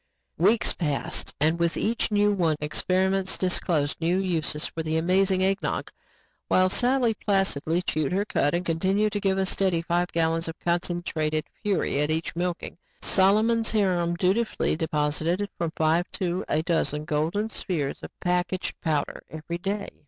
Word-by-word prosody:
Weeks 230 +1 +4
passed 150 -5 -2
and 160 +3 +2
with 170 -1 +1
each 230 +2 0
one 210 - 0
new 200 -6 +2
experiments 190 +5 0
disclosed 170 -5 0
new 170 +3 +2
uses 165 -5 -1
for 165 - -4
the 160 0 -1
amazing 185 +3 +2
Eggnog. 195 +1 -1 0.6
While 185 0 +4
Sally 245 +2 +2
placidly 190 -5 0
chewed 155 -5 -1
her 195 +3 0
cuds 145 -5 +1
and 180 - -5
continued 190 +6 +1
to 205 - 0
give 195 -1 +1
a 190 - +1
steady 185 -3 0
five 175 +1 +1
gallons 165 0 0
of 165 - -6
concentrated 170 -3 -1 0.2
fury 195 -8 0
at 150 - 0
each 160 +1 -1
milking, 175 0 -3 0.2
Solomon's 215 +4 +3
harem 180 -5 +1
dutifully 195 +5 +1
deposited 160 +4 0
from 170 -2 -2
five 160 +3 +1
to 180 -1 -2
a 155 - +1
dozen 155 -3 0
golden 170 +8 -1
spheres 150 -10 -3
of - - -7
packaged 180 0 -1
power 155 -3 -1
every 160 +2 -6
day. 200 +2 -3
175 Hz, 150 wpm, -26 LUFS, 160-195 Hz, 0.6 s, Weeks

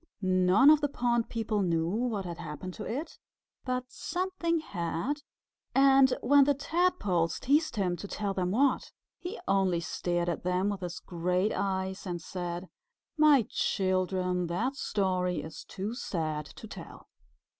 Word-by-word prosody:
None 185 +9 +5
of 310 -1 +5
the 290 - +2
pond 240 -3 0
people 220 -2 -1
knew 165 -3 +1
what 215 0 -1
had 170 -2 -6
happened 150 +5 -6
to 210 - -7
it, 290 +8 -5 0.5
but 255 -1 -1
something 355 -1 -1
had, 205 - -3 0.5
and 270 -1 +6
when 280 +2 +6
the 285 0 +3
Tadpoles 275 - +1
teased 290 0 +2
him 185 -4 0
to 200 - -7
tell 200 0 -2
them 185 -2 -1
what, 260 +8 +1 0.3
he 360 +5 -6
only 190 -3 +2
stared 175 +1 -2
at 175 - -1
them 180 +2 0
with 200 -2 -3
his 180 0 -5
great 180 +3 0
eyes 190 0 -2
and 175 -1 -3
said, 175 +1 -5 0.5
"My 300 -6 +5
children, 185 -1 0
that 230 +11 -1
story 185 -7 0
is 160 0 -8
too 200 +4 -5
sad 155 - -3
to 220 - -11
tell." - - -11
195 Hz, 150 wpm, -30 LUFS, 180-260 Hz, 0.5 s, and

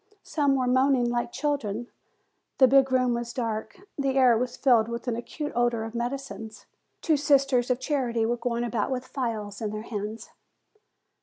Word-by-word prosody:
Some 285 -3 +1
were 260 -1 +1
moaning 255 -1 +3
like 240 0 -1
children. 245 -6 -2 0.7
The 260 - +7
big 270 +1 +4
room 255 -1 +3
was 235 0 -4
dark, 225 -3 -4 0.2
the 270 -1 0
air 255 -3 +6
was 245 +2 -2
filled 240 -5 +4
with 235 +1 -6
an 240 - 0
acute 295 +6 -5
odor 240 -2 +1
of 225 0 -6
medicines. 240 -2 -5 0.4
Two 315 -3 +3
sisters 275 -3 +3
of 250 0 +1
charity 250 -5 0
were 240 +2 0
going 235 0 -2
about 235 -1 -1
with 255 -1 -3
phials 220 -6 -4
in 215 - -1
their 215 +1 -5
hands. 215 0 -6
245 Hz, 170 wpm, -26 LUFS, 230-265 Hz, 0.7 s, The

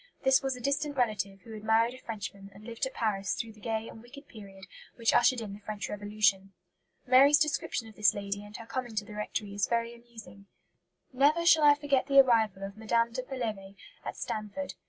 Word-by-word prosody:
This 265 0 +4
was 270 -1 -2
a - - -9
distant 285 +3 -1
relative 200 -5 -1
who 225 - -12
had 215 -1 -9
married 225 +2 +3
a 255 - -12
Frenchman 200 -3 -7
and 200 - -14
lived 235 +3 -3
at 265 - -10
Paris 200 -4 -1
through 225 -1 -5
the 215 - -19
gay 225 0 -3
and 220 - -11
wicked 275 +5 -14
period 195 -3 -12 0.3
which 230 -2 +1
ushered 240 0 +4
in 205 -3 -6
the 200 - -10
French 210 0 -6
Revolution. 205 -2 0 0.5
Mary's 270 +3 +6
description 285 -6 -1
of 220 - -14
this 210 -2 +3
lady 200 0 -4
and 205 0 -10
her 230 - -10
coming 240 0 -5
to 210 -1 -1
the 210 - -11
rectory 210 -1 -4
is 205 0 0
very 235 0 -1
amusing: 225 -5 -14 0.7
"Never 295 +6 +3
shall 320 -2 +6
I 290 0 +7
forget 280 -3 0
the 275 -1 +6
arrival 220 -7 +3
of 200 +1 -7
Mme. 230 +1 +1
de 255 - -2
Pelevé 220 -7 -5 0.3
at - - -6
Stanford. 215 +6 -5
225 Hz, 210 wpm, -29 LUFS, 205-255 Hz, 0.7 s, I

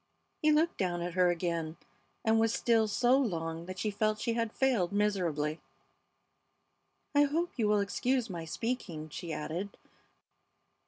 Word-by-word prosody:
He 305 - +4
looked 315 +3 +2
down 175 -2 0
at 175 0 -4
her 180 0 +4
again, 170 -2 -2 0.5
and 225 0 +4
was 225 0 +3
still 230 -2 +2
so 245 +5 +3
long 165 -8 -2
that 185 0 -6
she 210 +3 -1
felt 215 +1 0
she 230 - 0
had 230 -1 -1
failed 235 -10 +1
miserably. 175 -7 0 1.5
"I 290 0 +5
hope 330 +5 -1
you 225 -4 +1
will 210 -1 +3
excuse 245 +5 0
my 175 -5 -5
speaking," 170 -5 -4
she 170 +2 -6
added. 170 +6 -4
205 Hz, 150 wpm, -31 LUFS, 170-235 Hz, 1.5 s, I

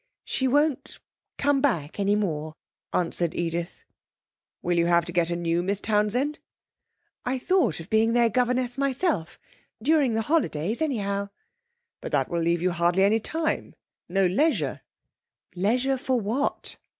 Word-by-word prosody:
'She 265 - 0
won't 290 +1 +1 0.4
come 280 -1 +2
back 175 - 0
any 200 +1 +2
more,' 155 -6 -2 0.4
answered 170 -1 -1
Edith. 170 0 -3 0.8
'Will 175 -1 +1
you 170 - +3
have 170 -1 +3
to 175 - -5
get 170 -1 +1
a 170 - -1
new 170 0 0
Miss 195 +2 -1
Townsend?' 220 +9 0 0.8
'I 255 +1 -1
thought 325 - +1
of 165 - -9
being 220 +1 +3
their 240 -1 +4
governess 250 +2 0
myself 275 - 0 0.4
during 275 -1 +2
the 225 - 0
holidays, 225 - 0
anyhow.' 200 -9 -1 0.7
'But - - -7
that - - +1
will 170 -1 -1
leave 170 +1 +1
you 185 - +2
hardly 175 +2 +2
any 210 +3 +4
time 320 +7 -2 0.3
no 195 +2 +2
leisure.' 185 - +1 0.7
'Leisure 245 +8 +1
for 260 -2 0
what?' 230 +7 -2
210 Hz, 145 wpm, -26 LUFS, 175-260 Hz, 0.8 s, their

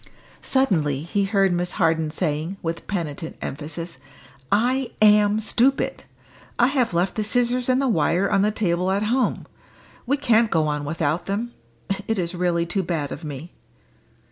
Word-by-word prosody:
Suddenly 160 - +1
he 195 +4 0
heard 195 -2 +2
Miss 175 0 -1
Harden 160 -4 +1
saying, 160 +3 -2
with 165 0 -4
penitent 160 -5 -4
emphasis, 160 +4 -6 0.5
"I 250 +4 +1
am 210 0 +5
stupid! 245 +5 +1 0.5
I 240 - +4
have 250 -9 0
left 180 +2 +1
the 215 - -2
scissors 245 +3 +1
and 255 0 +3
the 275 - +1
wire 180 -2 +2
on 200 -2 +2
the 210 - +3
table 185 -4 0
at 195 +2 +1
home; 245 +4 0 0.6
we 280 +3 +2
can't 235 -5 +3
get 170 - +1
on 150 -2 0
without 160 +2 -1
them; 215 +5 -2 0.6
it 225 - 0
is 175 -1 -2
really 175 -1 0
too 190 +3 -1
bad 165 -5 -3
of 155 - -7
me." 150 +3 -7
190 Hz, 160 wpm, -23 LUFS, 165-220 Hz, 0.6 s, am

